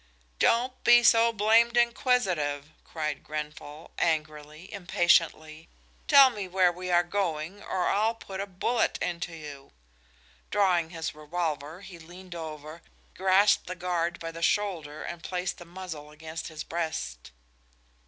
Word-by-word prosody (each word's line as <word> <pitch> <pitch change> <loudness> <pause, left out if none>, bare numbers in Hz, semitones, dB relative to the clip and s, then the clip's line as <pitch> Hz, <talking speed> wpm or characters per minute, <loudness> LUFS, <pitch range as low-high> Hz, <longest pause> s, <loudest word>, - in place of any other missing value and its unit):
"Don't 250 +2 +2
be 240 0 +7
so 230 0 +5
blamed 230 +2 +3
inquisitive," 190 - +1
cried 150 -3 -4
Grenfall, 150 0 -7
angrily, 155 +1 -2
impatiently. 165 -4 +1 0.4
"Tell 275 -3 +8
me 205 -5 -5
where 180 -1 +3
we 180 +1 -7
are 175 0 +4
going 175 -1 -3
or 180 - -2
I'll 220 +3 +1
put 195 -4 -8
a 200 - -4
bullet 210 +5 0
into 170 -1 -3
you!" 145 -3 -10 0.8
Drawing 180 -5 +2
his 165 -1 -5
revolver 155 +1 -4
he 180 -3 -11
leaned 180 +2 -12
over, 155 -1 -8 0.3
grasped 190 +2 +3
the 185 - -5
guard 175 -1 -2
by 165 0 -5
the 165 0 -9
shoulder 170 -5 -1
and 170 -1 -6
placed 180 0 -3
the 175 - -10
muzzle 170 -4 -8
against 160 +1 -7
his 155 -1 -7
breast. 160 - -4
175 Hz, 135 wpm, -28 LUFS, 155-195 Hz, 0.8 s, Tell